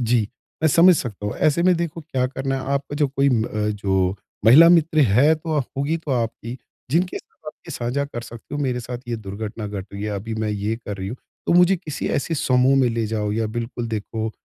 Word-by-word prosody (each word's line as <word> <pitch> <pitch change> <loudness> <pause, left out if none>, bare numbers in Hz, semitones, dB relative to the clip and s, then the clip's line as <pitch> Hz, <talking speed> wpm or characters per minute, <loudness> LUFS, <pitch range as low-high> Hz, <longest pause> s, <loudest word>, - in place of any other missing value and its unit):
जी, 115 -2 +2 0.3
मैं 160 - +5
समझ 175 +5 +6
सकता 105 -6 -4
हूँ। 105 - -3
ऐसे 155 +3 +2
में 185 0 +5
देखो 170 -1 -3
क्या 135 -5 -1
करना 135 +1 -3
है? - - -3
आपका 140 +1 -3
जो 145 -1 +3
कोई 140 +1 +1
उम, 120 -5 +2 0.3
जो 95 -2 0 0.3
महिला 150 +10 +9
मित्र 165 -2 +4
है 145 +8 +5
तो 155 -1 -2
ह 140 - +1
होगी 140 +4 0
तो 160 -3 -7
आपकी, 115 +1 -3 0.3
जिनके 175 +5 +1
साथ - - -22
आप 155 - -5 0.2
ये - - -6
साझा 125 +3 -2
कर 130 -4 -6
सकते 120 +4 -10
हो, 145 - -2
मेरे 125 -2 -1
साथ 120 +1 -6
ये 120 - -1
दुर्घटना 105 +1 -6
घट 100 -2 -6
रही 100 0 -6
है, 105 - -2
अभी 110 +3 -4
मैं 110 -1 -2
ये 105 +2 -2
कर 105 -4 -7
रही 95 0 -5
हूँ, 120 - -5 0.3
तो - - +2
मुझे 180 +2 +5
किसी 165 -4 -5
ऐसे 165 +4 -1
समूह 130 -2 +3
में 125 - +3
ले 115 -1 -1
जाओ 105 -1 -2
या 110 +1 0
बिल्कुल 115 +2 -4
देखो 110 0 -3
125 Hz, 235 wpm, -22 LUFS, 110-145 Hz, 0.3 s, महिला